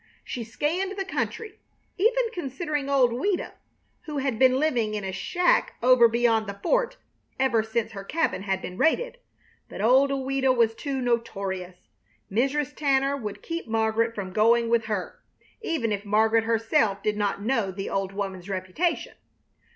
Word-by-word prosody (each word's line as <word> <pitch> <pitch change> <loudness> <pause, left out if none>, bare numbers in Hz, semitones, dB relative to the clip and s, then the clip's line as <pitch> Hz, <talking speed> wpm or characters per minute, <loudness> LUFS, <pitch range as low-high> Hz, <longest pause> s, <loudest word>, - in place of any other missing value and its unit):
She 240 - -5
scanned 345 - -2
the 390 - -2
country, 435 +1 -4 0.4
even 460 +6 +3
considering 295 - -3
old 260 -4 +4
Ouida, 355 +10 -1 0.5
who 300 -2 -5
had 265 -5 -1
been 260 0 +5
living 240 -8 +1
in 210 - -3
a 190 - -3
shack 360 - +1
over 250 -1 +7
beyond 230 -2 +2
the 200 0 -6
fort - - +1 0.4
ever 255 -4 +3
since 220 0 -2
her 195 -2 -7
cabin 320 +1 -1
had 195 -1 -2
been 180 - -7
raided; - - +1 0.5
but - - -9
old 255 +6 +4
Ouida 270 -1 +1
was 230 -3 +3
too 270 +3 -4
notorious. 195 -6 -2 0.6
Mrs. 275 +6 0
Tanner 275 -1 +2
would 215 -7 -6
keep 335 -4 -5
Margaret 225 +1 +1
from 190 -2 -5
going 230 +2 +3
with 230 -1 +2
her, 210 -4 -4 0.4
even 315 - -1
if 205 -1 -2
Margaret 220 +2 +3
herself 225 -2 +1
did 210 0 0
not 205 -1 -1
know 225 -4 +1
the 195 +1 -5
old 195 -1 -1
woman's 195 -2 -5
reputation. 195 - -2
235 Hz, 160 wpm, -26 LUFS, 210-285 Hz, 0.6 s, over